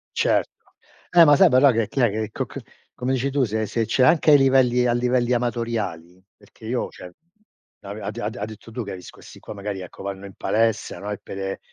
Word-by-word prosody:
Cer - - +2 0.7
Eh 170 -1 +9
ma 145 -1 +6
sai 190 +3 +6
però, 135 +1 +5
che 115 -2 0
chi - - -5
è 120 - +4
che 110 +1 -3
co - - -3
c - - -9 0.4
come 125 +1 -2
dici 135 +1 -1
tu 140 -1 +1
se 110 -1 -1
se 115 +1 -1
c'è 130 - +1
anche 155 +2 +4
ai 145 - +8
livelli 130 -2 +3
a 120 - +2
livelli 125 0 +1
amatoriali, 115 -8 -3
perché 105 +2 -17
io 125 +1 -2
cioè, 90 - -12 0.7
avea 100 +2 -8
ha - - -2
d 115 +1 -5
ha - - -3
detto 110 +1 -12
tu, 120 +1 -4
che 100 - -7
ha - - -5
vis 90 - -11
questi - - -15
qua, - - -9
magari 100 -1 -5
ecco, 90 +1 -10
vanno 100 0 -6
in 100 - -10
palestra, 115 0 0
no? 105 +1 -5
E 105 - -3
pere 95 0 -6
115 Hz, 230 wpm, -23 LUFS, 100-125 Hz, 0.7 s, Eh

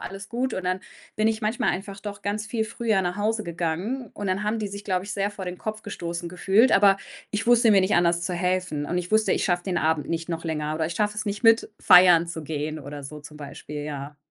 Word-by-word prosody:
alles 195 0 -7
gut.“ 250 +1 -2
Und 185 - -4
dann 185 +1 -1 0.4
bin 215 +1 +3
ich 220 0 -1
manchmal 215 +2 0
einfach 195 +1 -5
doch 205 -1 -7
ganz 205 +1 -2
viel 220 -1 -1
früher 225 -2 0
nach 180 +1 -2
Hause 215 +1 0
gegangen. 180 +8 -3
Und 205 - -5
dann 190 +2 0
haben 215 +2 0
die 210 -2 -3
sich, 200 +1 -8
glaube 185 -1 -1
ich, - - -4
sehr 200 0 0
vor 200 -2 -7
den 180 0 -4
Kopf 215 0 -4
gestoßen 170 -3 -5
gefühlt, 195 +7 +3
aber 195 -1 +5 0.3
ich 210 +2 -2
wusste 240 -1 +5
mir 200 - +6
nicht 190 +2 +2
anders 175 0 +3
zu 180 0 -2
helfen. 180 -4 -1
Und 175 +3 -1
ich 180 0 -5
wusste, 215 0 +3
ich - - 0
schaffe 175 -2 0
den 180 -3 0
Abend 160 -1 0
nicht 165 0 -2
noch 165 -1 -4
länger 155 -2 -2
oder 160 0 -1
ich 170 - -4
schaffe 210 +2 0
es 215 - -3
nicht, 205 +4 -3
mit 225 -1 +5
feiern 180 -2 +7
zu 165 -2 -6
gehen 155 +1 -3
oder 145 0 -8
so 150 +2 -8
zum 150 +1 -12
Beispiel, 150 0 -7
ja. 145 0 -6
185 Hz, 250 wpm, -25 LUFS, 170-210 Hz, 0.4 s, feiern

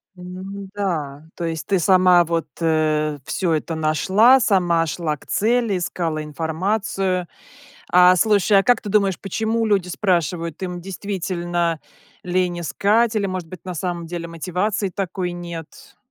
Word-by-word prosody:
Н-да, 185 -5 -5
то 170 - -4
есть 165 -1 -4
ты 195 - +2
сама 180 0 +5
вот, 165 0 -1
э, 155 -2 +1
всё 175 +1 -1
это 160 +1 -2
нашла, 190 - +4
сама 175 -7 +2
шла 155 -1 -2
к - - -20
цели, 230 -2 +1
искала 165 -3 -2
информацию. 180 +4 -2 0.6
А 180 0 +7
слушай, 205 0 +3
а - - +1
как 245 +1 +3
ты 210 - -8
думаешь, 195 -3 +2
почему 220 +3 -1
люди 195 -4 +1
спрашивают? 170 -3 -1
Им 180 -1 -4
действительно 175 -3 -2 0.4
лень 180 -1 0
искать 215 +7 +1
или, 200 - 0
может 185 -4 -4
быть, 185 - -11
на 180 - -4
самом 175 0 -3
деле 170 0 -5
мотивации 185 +5 -2
такой 185 -1 -3
нет? 170 -2 -9
180 Hz, 140 wpm, -21 LUFS, 165-195 Hz, 0.6 s, А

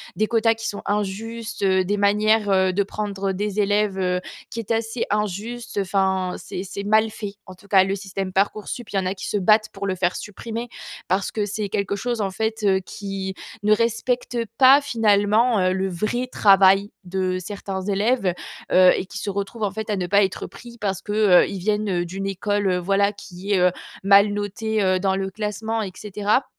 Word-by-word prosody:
des 215 - +1
quotas 225 0 +3
qui 225 0 -5
sont 205 - -4
injustes, 210 +3 -3
heu, 190 -1 +3
des 205 +3 -1
manières, 210 +1 +3
heu, 190 -1 +3
de 200 +2 +2
prendre 200 -1 -3
des 205 +1 -2
élèves, 205 -1 +1
heu, 180 -1 0 0.3
qui 230 - -4
est 225 - -7
assez 225 +1 -1
injuste. 210 +4 -3
Enfin 190 -1 0
c'est 185 - -6
c'est 200 +1 -6
mal 220 +1 +3
fait. 205 -2 -6
En 185 - -9
tout 200 - -20
cas, 190 -2 +5
le 195 +1 -1
système 195 -1 -5
Parcoursup, 205 +4 -1
il - - -6
y - - +3
en 185 - -3
a 185 - 0
qui 190 - -7
se 210 - 0
battent 215 +3 +3
pour 200 0 -4
le 185 - -1
faire 180 0 0
supprimer. 230 +3 -6 0.4
Parce 190 +1 0
que 210 -2 -1
c'est 210 0 -3
quelque 200 +1 -2
chose 240 0 -2
en 195 -1 -1
fait, 220 +2 -2
heu, 190 -2 +3
qui 190 0 -6 0.3
ne 210 +1 +5
respecte 235 +2 -1 0.2
pas 270 +2 +8
finalement, 220 -1 +3
heu, 185 0 +2
le 190 0 -1
vrai 215 +8 -2
travail 195 0 +5
de 185 0 -1
certains 195 0 -5
élèves, 200 0 +1 0.4
heu, 185 0 +7
et - - -3
qui 200 - -8
se 200 - -3
retrouvent 200 +3 -4
en 200 - 0
fait 220 +1 -6
à 210 - +1
ne 180 -2 -2
pas 200 +2 +4
être 190 -2 -2
pris 235 -1 -12
parce 195 -3 -2
que, 205 - -6
heu, 210 -4 +5
ils 195 - -5
viennent 200 -2 0
d'une 195 +3 -4
école, 195 0 0
voilà, 195 +3 +2
qui 195 -1 -8
est, - - +4
heu, 180 0 +4 0.3
mal 200 +1 +6
notée, 210 +1 -2
heu, 185 -1 +2
dans 190 0 +1
le 190 0 -3
classement 220 +2 -3
et 190 -3 -4
cetera, 210 +5 0
200 Hz, 205 wpm, -23 LUFS, 190-215 Hz, 0.4 s, pas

